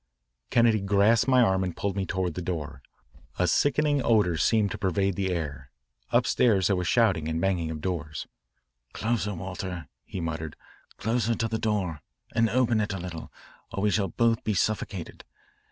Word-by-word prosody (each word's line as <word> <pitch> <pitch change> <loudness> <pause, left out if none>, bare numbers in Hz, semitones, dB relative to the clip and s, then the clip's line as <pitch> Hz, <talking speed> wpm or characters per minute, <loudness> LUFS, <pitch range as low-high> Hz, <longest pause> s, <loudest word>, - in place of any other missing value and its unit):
Craig 115 -4 +3
grasped 105 +4 +4
my 130 -1 +5
arm 95 -3 +2
and 90 -3 -4
pulled 100 -1 -2
me 95 -2 -2
toward 95 -2 -1
the 90 - -4
door. 85 -4 -4 0.6
A 90 - +2
sickening 145 - +2
odour 105 -7 +3
seemed 105 +6 +2
to - - -5
pervade 95 -1 +1
the 95 0 -1
air. 70 -6 -4 0.4
Upstairs 100 -7 +3
there 95 - +3
was 90 -1 -2
shouting 95 -10 +3
and 80 0 -1
banging 85 -3 0
of 80 -1 -5
doors. 80 -4 -3 0.7
"Closer, 110 -3 -1
Walter," 90 -1 -5 0.2
he 95 - -7
muttered, 80 -2 -4 0.4
"closer 115 0 0
to 115 - -1
the 110 0 -2
door, 95 -8 -1 0.3
and 115 -1 +3
open 120 -2 +2
it 105 -1 -2
a - - -3
little, 85 -2 -7 0.4
or 100 - -3
we 105 - +3
shall 100 0 +1
both 115 +4 +1
be 105 - 0
suffocated. 100 -2 -2
95 Hz, 170 wpm, -27 LUFS, 85-110 Hz, 0.7 s, my